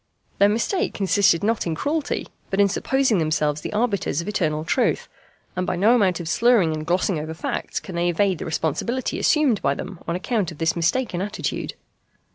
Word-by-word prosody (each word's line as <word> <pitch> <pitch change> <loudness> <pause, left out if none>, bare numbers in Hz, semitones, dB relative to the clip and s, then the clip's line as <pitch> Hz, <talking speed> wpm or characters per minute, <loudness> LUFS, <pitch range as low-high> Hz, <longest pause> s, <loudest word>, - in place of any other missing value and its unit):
Their 200 - +6
mistake 235 - 0
consisted 195 -3 +3
not 220 -3 0
in 165 - -1
cruelty, 295 - -2 0.2
but 195 - -1
in 200 - +6
supposing 250 +2 +1
themselves 155 -2 0
the - - -5
arbiters 210 - 0
of 170 - -4
eternal 155 -6 -1
truth; 250 +9 +1 0.5
and 185 0 -2
by - - 0
no 205 +7 +4
amount 190 -8 +2
of 170 - -6
slurring 220 -4 +3
and 155 0 -5
glossing 180 -1 +1
over 155 +1 -5
facts 165 - -3
can 190 - -9
they 170 +1 +1
evade 185 +1 +1
the - - -5
responsibility 165 - -2
assumed 290 -9 +3
by 140 - +1
them 180 +2 -7
on 170 - -1
account 195 -1 -1
of 165 - -11
this 165 0 +1
mistaken 175 +3 0
attitude. 205 +2 -3
185 Hz, 190 wpm, -23 LUFS, 165-220 Hz, 0.5 s, Their